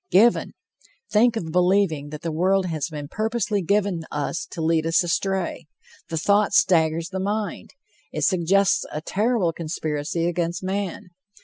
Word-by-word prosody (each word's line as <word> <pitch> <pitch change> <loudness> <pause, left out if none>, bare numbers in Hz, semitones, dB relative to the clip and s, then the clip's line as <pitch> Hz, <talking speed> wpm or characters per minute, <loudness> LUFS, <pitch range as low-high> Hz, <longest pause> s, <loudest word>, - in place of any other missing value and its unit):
Given! 225 +5 +4 0.6
Think 230 +2 +4
of 165 -8 -4
believing 180 -4 +2
that 150 0 -8
the 165 - -2
world 185 +4 +2
has 160 -2 -2
been 150 -2 -6
purposely 215 +2 -1
given 195 -2 0
us 150 +3 -3
to - - -8
lead 160 0 +1
us 165 +2 +3
astray. 175 -1 -2 0.4
The 165 - -2
thought 200 +5 +2
staggers 165 -3 +3
the 190 -1 -4
mind. 205 +2 -3 0.4
It - - -3
suggests 195 +2 +3
a 150 - -4
terrible 205 -1 0
conspiracy 155 0 -2
against 175 +1 -2
man. 190 0 -3
180 Hz, 145 wpm, -23 LUFS, 160-200 Hz, 0.6 s, Given